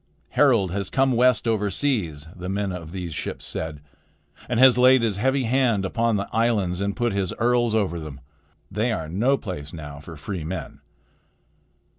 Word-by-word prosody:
"Harald 115 - +3
has 100 0 -3
come 135 0 +2
west 125 -1 +3
over 105 -2 +1
seas," 90 - -1
the 90 0 -6
men 100 0 -1
of 85 -3 -7
these 90 -3 -5
ships - - -5
said, 80 -2 -4 0.7
"and 120 -2 0
has 130 -1 +8
laid 125 0 +5
his 105 -4 0
heavy 130 +5 +1
hand 120 -5 +2
upon 115 +3 +1
the 100 0 -2
islands 105 -6 +1
and 100 0 -1
put 120 -3 0
his 95 -2 -1
earls 120 -1 +2
over 95 -6 0
them. 75 -3 -8 0.5
They 110 +5 0
are 80 -8 -3
no 115 - +1
place 80 - -6
now 75 -3 -8
for 80 +2 -10
free 85 +2 -5
men." 90 +5 -6
100 Hz, 175 wpm, -24 LUFS, 90-120 Hz, 0.7 s, has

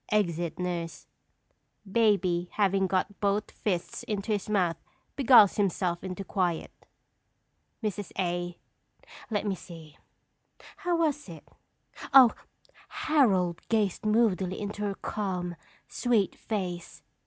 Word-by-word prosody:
[Exit 175 -6 0
nurse. 170 -3 -4 0.8
Baby 190 -5 +2
having 195 -2 +2
got 190 +2 -1
both 205 +1 0
fists 180 -5 -3
into 210 0 -3
his 205 -1 -1
mouth 180 -6 +1 0.4
beguiles 245 -7 +6
himself 185 -3 0
into 190 +1 -5
quiet. 180 -4 -1 1.1
Mrs. 205 -2 -3
A. 175 -1 -2 0.7
Let 210 -2 -1
me 200 - 0
see! 165 -4 -11 0.8
How 355 -4 0
was 295 - 0
it? 165 -3 -11 0.7
Oh! 255 -4 +10 0.6
"Harold 250 - +2
gazed 210 -5 +1
moodily 210 -4 +1
into 205 0 -5
her 200 -1 -1
calm, 180 -5 -3 0.3
sweet 230 -6 +1
face. 180 -5 -5
195 Hz, 110 wpm, -28 LUFS, 175-215 Hz, 1.1 s, Oh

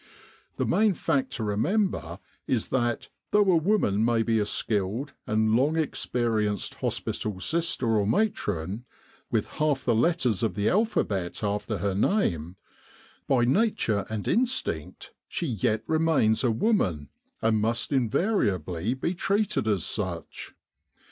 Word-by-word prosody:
The - - 0
main 210 -3 +3
fact 140 -6 0
to 120 - -3
remember 110 - 0 0.3
is 120 -4 0
that, 120 -3 -1 0.2
though 205 -2 +4
a - - +4
woman 160 - +2
may 115 -1 +2
be 115 -1 +1
a 105 - 0
skilled 105 +8 -1
and 110 0 +2
long 140 +6 +2
experienced 115 - -1
hospital 105 -3 -3
sister 165 - 0
or 100 -1 +1
matron, 105 - -1 0.5
with - - 0
half 150 -3 +1
the 120 - +3
letters 125 - +2
of 110 -5 0
the 100 +1 +1
alphabet 110 - 0
after 105 +1 -1
her 100 +2 -1
name, 95 - 0 0.7
by 125 -3 +3
nature 125 - +1
and 110 -2 -4
instinct 255 +2 -1
she 175 - -3
yet 110 - 0
remains 155 -8 +2
a 125 - +3
woman 110 - +1 0.3
and 110 -1 +2
must 115 +5 0
invariably 110 - 0
be 165 +7 -2
treated 200 - 0
as 100 -6 +1
such. - - -5
115 Hz, 135 wpm, -27 LUFS, 105-165 Hz, 0.7 s, though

